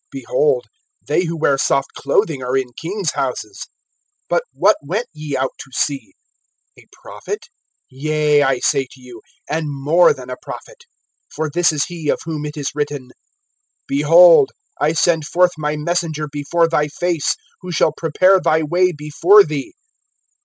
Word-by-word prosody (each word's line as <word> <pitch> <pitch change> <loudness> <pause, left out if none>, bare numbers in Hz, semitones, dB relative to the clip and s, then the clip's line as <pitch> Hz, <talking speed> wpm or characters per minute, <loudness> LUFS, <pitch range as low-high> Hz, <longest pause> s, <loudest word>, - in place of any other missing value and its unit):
Behold, 470 - 0 0.4
they 180 - +1
who 165 0 -4
wear 140 -3 +1
soft 135 0 0
clothing 160 -10 0
are 125 +1 -1
in 125 -2 -3
king's 180 - -3
houses. 135 - -4 0.6
(9)But - - +3
what - - +3
went 190 +12 -3
ye 150 -3 -4
out 130 0 -1
to - - -10
see? 145 - -2 0.6
A - - -19 0.2
prophet[11:9]? 415 - -6 0.5
Yea, 150 +2 +1
I 135 -2 +2
say 135 -3 +1
to 130 - -17
you, 125 -3 -13 0.3
and 155 0 -2
more 145 +5 +3
than 130 -1 -6
a 125 - -5
prophet. - - -10 0.5
(10)For 155 -1 -2
this 175 0 +3
is 150 -2 -1
he 165 -4 -6
of - - +2
whom 155 -2 -4
it 150 - -8
is 145 -2 -3
written: 145 -3 -4 0.8
Behold, 475 - +6 0.3
I 150 +2 +2
send 160 -1 +1
forth 180 +1 +3
my 150 -1 -2
messenger 155 -1 -2
before 150 +4 0
thy 150 -2 +1
face, 170 0 -1 0.3
Who 180 - -7
shall 160 -2 +2
prepare 185 +4 +3
thy 160 -2 +2
way 180 +4 +2
before 165 +6 +4
thee. 150 -4 -5
155 Hz, 160 wpm, -18 LUFS, 145-180 Hz, 0.8 s, Behold